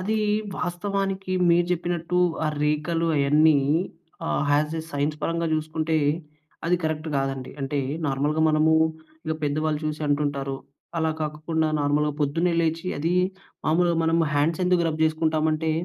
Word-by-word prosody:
అది 215 +4 0 0.4
వాస్తవానికి 195 +1 -2 0.2
మీరు 170 +1 +4
చెప్పినట్టు 175 0 -1 0.3
ఆ - - +2
రేఖలు 155 +3 0
అవన్నీ 150 +2 +5 0.7
ఆహ్, 150 - 0
యాజ్ 150 +2 +1
ఎ - - -8
సైన్స్ 145 +2 -1
పరంగా 170 0 0
చూసుకుంటే, 155 +1 -1 0.7
అది 180 +1 +3
కరెక్ట్ 155 0 -2
కాదండి. 135 -1 -2
అంటే, 135 +1 -2 0.3
నార్మల్‍గా 145 +3 0
మనము 155 +1 +3 0.5
ఇక 160 - 0
పెద్దవాళ్ళు 150 +1 0
చూసి 155 0 -3
అంటుంటారు. 145 -2 -1 0.4
అలా 160 0 +1
కాకుండా, 155 +1 -1
నార్మల్‍గా 145 +1 +1
పొద్దున్నే 165 +5 +1
లేచి, 165 +2 -1
అది 165 +4 0 0.5
మామూలుగా 170 +1 +3
మనము 165 0 +3
హ్యాండ్స్ 155 +5 +1
ఎందుకు 180 -1 +3
రబ్ 155 0 -3
చేసుకుంటామంటే, 160 0 +1
155 Hz, 135 wpm, -25 LUFS, 150-170 Hz, 0.7 s, అవన్నీ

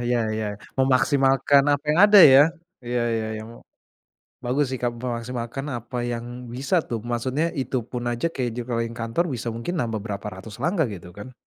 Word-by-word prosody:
Ya 120 0 +1 0.2
ya. 110 - -2 0.3
Memaksimalkan 135 +2 +3
apa 145 +1 -1
yang 155 +3 +2
ada 205 -1 +8
ya, 140 -3 +9 0.4
iya 120 0 -1
iya 110 -1 -2
iya - - -7
mu 115 - -12 0.9
bagus 135 +4 +1
sih, 130 - -3
Kak, 120 -1 0
memaksimalkan 120 +2 -4
apa 120 +1 -4
yang 120 +1 -6
bisa 135 +8 -1
tuh 115 -2 -4
maksudnya 125 +7 -1
itupun 125 -1 -3
aja 120 +8 -1
kayak 125 -7 -3
di 120 - -6
jengkeling 115 -1 -2
kantor 115 +9 0
bisa 120 -1 -4
mungkin 120 +10 -4
nambah 115 -3 -2
berapa 100 -1 -5
ratus 105 +4 -11
langkah 170 +3 +1
gitu 90 -2 -9
kan. 130 +5 -9
120 Hz, 180 wpm, -24 LUFS, 115-135 Hz, 0.9 s, ya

